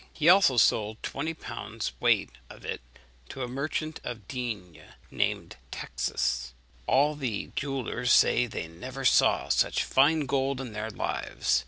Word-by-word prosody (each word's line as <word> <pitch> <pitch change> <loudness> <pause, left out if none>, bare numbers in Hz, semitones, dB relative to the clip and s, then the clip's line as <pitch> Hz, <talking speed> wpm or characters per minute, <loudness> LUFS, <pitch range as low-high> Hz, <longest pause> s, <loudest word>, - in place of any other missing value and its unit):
He 160 +1 +3
also 180 -9 +6
sold 110 -1 +3
twenty 160 +4 -3
pounds 155 - -5
weight - - +2 0.2
of - - -12
it - - -4 0.5
to 130 - -5
a - - -3
merchant 155 +5 -3
of 115 -5 -7
Digne, 110 -10 -5 0.3
named - - -2
Taxis. 65 0 -2 0.3
All 145 +3 +4
the 130 -8 -4
jewellers 130 -3 -1
say 120 +1 +5
they 85 - -5
never 130 +11 -7
saw - - +4
such - - +2
fine 150 +4 +4
gold 135 -1 0
in 125 -5 -6
their 110 +1 -4
lives. 65 -9 -1
125 Hz, 145 wpm, -28 LUFS, 110-140 Hz, 0.5 s, also